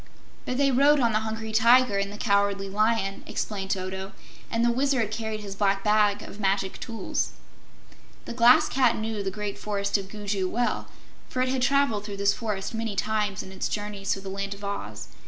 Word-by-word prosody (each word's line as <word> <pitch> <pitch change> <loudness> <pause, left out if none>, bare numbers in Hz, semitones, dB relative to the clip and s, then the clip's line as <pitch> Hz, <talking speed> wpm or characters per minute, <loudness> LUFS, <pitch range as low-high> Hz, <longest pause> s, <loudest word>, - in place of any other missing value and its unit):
"But 250 - -1
they 275 0 +3
rode 285 +3 +5
on 235 -3 +3
the 215 - +3
Hungry 220 0 -4
Tiger 230 -1 +5
and 200 0 -2
the 205 - -8
Cowardly 200 -2 +1
Lion," 210 0 0
explained 195 -3 -3
Toto, 190 0 -3 0.4
"and 230 0 +1
the 240 - +4
Wizard 260 -3 +1
carried 220 -1 -3
his 200 -1 -6
Black 195 -1 +1
Bag 210 -1 +3
of 205 - -10
Magic 195 -1 0
Tools." 230 -2 -3 0.9
The - - -5
Glass 240 +1 +6
Cat 250 -3 +3
knew 220 -1 -3
the 195 - -2
Great 205 +1 -5
Forest 200 -1 -1
of 190 -1 -8
Gugu 205 -2 -2
well, 240 +4 -1 0.4
for 255 - 0
it 255 - -1
had 260 0 0
traveled 275 -5 +2
through 205 -1 -6
this 200 0 +3
forest 210 -3 -4
many 225 -2 -3
times 210 -1 -1
in 190 - -11
its 190 - -3
journeys 205 -1 -3
through 195 - -2
the 195 - -6
Land 200 0 -3
of 200 - -14
Oz. 200 0 -5
210 Hz, 195 wpm, -26 LUFS, 200-230 Hz, 0.9 s, Glass